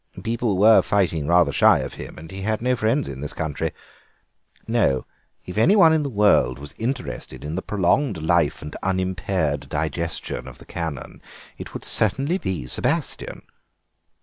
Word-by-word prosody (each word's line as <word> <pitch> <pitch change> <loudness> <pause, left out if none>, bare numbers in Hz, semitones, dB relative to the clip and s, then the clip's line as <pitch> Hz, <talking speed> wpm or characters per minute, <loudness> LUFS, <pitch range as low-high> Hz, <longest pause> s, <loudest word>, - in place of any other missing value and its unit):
People 115 -3 -1
were 110 +3 +7
fighting 85 -7 0
rather 85 -3 +4
shy - - +5
of - - -4
him, - - -9
and 80 +1 -10
he 95 0 -7
had 110 +2 -1
no 125 +2 +1
friends 120 +5 0
in 65 -1 -7
this 75 - -4
country. 80 -2 -3 1.0
No; 105 - +1 0.4
if 90 +4 -3
anyone 165 - +6
in 160 - +2
the 145 - -2
world 100 - +3
was 70 0 -8
interested 110 - -4
in 75 - -4
the 95 - -2
prolonged 105 - +1
life 80 -1 +1
and 75 - -7
unimpaired 95 -5 -1
digestion 80 +2 -3
of - - -10
the - - -15
Canon 80 -5 -6 0.4
it - - -9
would - - -5
certainly 135 - +1
be 95 - -3
Sebastien." 65 - -2
95 Hz, 160 wpm, -23 LUFS, 80-115 Hz, 1.0 s, were